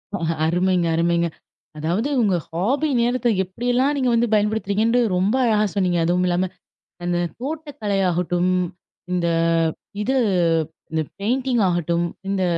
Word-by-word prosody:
ஓ! - - -1 0.3
அருமைங்க, 180 +1 +2
அருமைங்க. 170 +1 +2 0.5
அதாவது 175 - -1
உங்க 200 -5 +2 0.2
ஹாஃபி 250 - 0
நேரத்த 245 0 +1 0.2
எப்படியெல்லாம் 245 +8 0
நீங்க 255 -2 +1
வந்து 235 +1 +3
பயன்படுத்துறீங்கன்று 215 +2 +2 0.2
ரொம்ப 195 +7 +2
அழகா 215 -3 +3
சொன்னீங்க. 180 -3 +1
அதுவும் 180 +2 +2
இல்லாம, 180 +1 0 0.6
அந்த 175 0 0 0.2
தோட்டக்கலை 280 -8 -3
ஆகட்டும், 180 +1 0 0.6
இந்த 175 -1 0 0.8
இது 265 +5 0 0.8
இந்த 160 0 0 0.2
பெயிண்டிங் 245 +3 0
ஆகட்டும் 170 -1 0 0.3
இந்த 195 -1 0
200 Hz, 120 wpm, -22 LUFS, 175-240 Hz, 0.8 s, வந்து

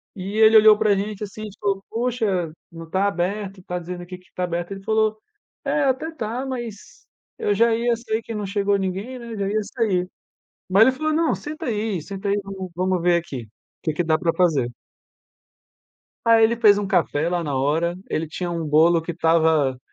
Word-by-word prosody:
e 195 +2 -5
ele 220 0 +6
olhou 215 -1 +8
pra 215 -1 +3
gente 205 +1 -3
assim, 210 +1 -8
a - - -5
gente 205 -2 -10
falou: 195 -1 -1
"Poxa, 225 -8 -1 0.2
não 165 0 -9
tá 190 +4 +1
aberto, 195 0 -3
tá 180 0 -4
dizendo 175 +1 -7
aqui 180 +1 -9
que 185 - -25
está 180 - -4
aberto". 175 0 -2
Ele 195 0 -7
falou: 220 0 +1 0.5
"É, - - +1
até 270 +5 0
tá, 245 -3 -4
mas, 245 - -7 0.3
eu 205 - +1
já 230 +2 +4
ia, 235 +1 +1
sei 225 -1 -3
que 225 0 -7
não 210 -1 -3
chegou 200 +1 +1
ninguém, 195 +7 -3
né, 235 -2 -8
já 200 -2 -2
ia 215 +1 0
sair". 200 -4 -1 0.6
Mas 195 +3 +5
ele 260 - +6
falou: 310 +4 -1
"Não 320 +1 +2
senta 305 +1 -6
aí 215 -5 -1
senta 195 +5 -6
aí 200 +1 +1
vamo 190 -1 -7
vamo 185 0 +1
ver 175 0 +3
aqui, 145 -7 -7
o - - -20 0.3
que 155 - 0
que 175 - 0
dá 160 -1 +3
pra 165 0 +1
fazer". 155 -9 +2 1.6
Aí 230 -1 +6
ele 230 +1 +2
fez 210 -3 +6
um 205 - -2
café 170 -4 +1
lá 175 0 -1
na 145 -4 -2
hora, 160 +6 +1
ele 160 - -1
tinha 175 +3 -4
um 170 -1 -3
bolo 160 +3 +4
que 165 +2 -5
estava 160 -5 +2
195 Hz, 210 wpm, -23 LUFS, 175-220 Hz, 1.6 s, olhou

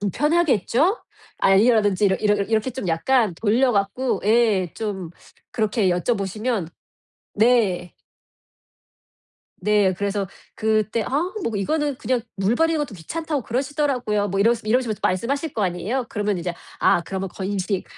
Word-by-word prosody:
불편하겠죠?" 295 - +2 0.4
아 195 - +4
이러든지 210 -3 +3
이러 190 -1 +4
이러 210 +1 +2
이렇게 220 +4 0
좀 250 -4 -5
약간 215 +3 +2
돌려 235 +6 +2
갖고 205 +5 0
예 210 -6 +3
좀 200 -5 -4 0.4
그렇게 215 -3 +1
여쭤보시면 200 +1 -1 0.7
네. 205 -6 +2 1.7
네. 205 -2 +3
그래서 200 +1 -2 0.3
그때 220 +1 0
"아 - - -6 0.3
뭐 230 - -2
이거는 290 +6 -1
그냥 245 0 -1
물 195 +4 +1
버리는 325 +2 +2
것도 290 -7 -3
귀찮다고 300 - -4
그러시더라고요." 250 -4 -1
뭐 195 +1 -1
이러시 230 +2 +3
이러시면서 230 -1 0
말씀하실 275 - -1
거 215 - -2
아니에요. 205 +8 -1
그러면 205 -3 -1
이제 175 0 -3 0.2
아 170 - +3
그러면 190 +2 -4
건식 195 0 -3
215 Hz, 315 characters per minute, -22 LUFS, 195-250 Hz, 1.7 s, 아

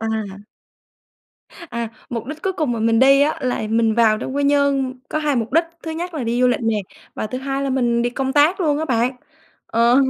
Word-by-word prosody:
À. 220 -3 -3 1.3
À, 235 -1 -3 0.2
mục 230 -2 -4
đích 300 +3 -7
cuối 385 - 0
cùng 310 -9 -1
mà 235 - -2
mình 225 0 +3
đi 275 +2 +6
á, 295 +2 +2
là 250 -3 -1
mình 225 -1 +2
vào 220 -2 +4
trong 260 - -5
Quy 285 - +1
Nhơn 280 -2 +2
có 310 - -1
2 300 -3 0
mục 230 0 -2
đích, 330 +3 +4 0.2
thứ 325 - -5
nhất 340 +2 -5
là 285 -6 -3
đi 235 +2 0
du 250 - +5
lịch 245 - 0
nè, 225 -2 0 0.4
và - - -3
thứ 255 +4 -5
hai 270 +1 -3
là 275 - -1
mình 240 -2 +1
đi 240 - 0
công 265 +1 -2
tác 300 +7 +3
luôn 295 -4 +1
á 315 - -1
bạn. 250 -2 0 0.5
Ờ, 235 +2 +3
255 Hz, 230 wpm, -20 LUFS, 230-290 Hz, 1.3 s, đi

